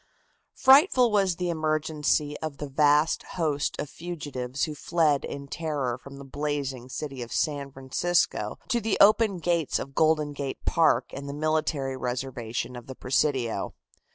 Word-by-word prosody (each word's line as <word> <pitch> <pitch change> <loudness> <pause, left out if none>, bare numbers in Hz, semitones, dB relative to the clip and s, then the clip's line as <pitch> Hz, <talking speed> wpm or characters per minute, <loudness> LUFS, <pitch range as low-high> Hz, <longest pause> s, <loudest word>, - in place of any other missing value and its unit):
Frightful 265 - +6
was 195 -4 +2
the 180 0 -1
emergency 155 -2 0
of 155 -3 -5
the 145 - -4
vast 150 +3 +3 0.2
host 150 -4 0
of 150 - -2
fugitives 140 -6 -5
who 155 - -1
fled 150 -2 +1
in 140 0 -6
terror 145 -6 -2
from 140 +2 -12
the 140 - -9
blazing 135 -3 -3
city 135 -1 -5
of 120 - -7
San 145 -3 -1
Francisco 135 +7 0
to 240 -3 +1
the 220 -1 0
open 210 -1 +5
gates 170 -2 0
of 135 - -6
Golden 155 -1 +2
Gate 140 -1 -5
Park 165 -1 +3
and 140 +1 -6
the 140 - -5
military 155 -3 0
reservation 125 -1 -4
of 120 - -9
the 130 - -7
Presidio. 125 -5 0
150 Hz, 155 wpm, -27 LUFS, 135-165 Hz, 0.2 s, Frightful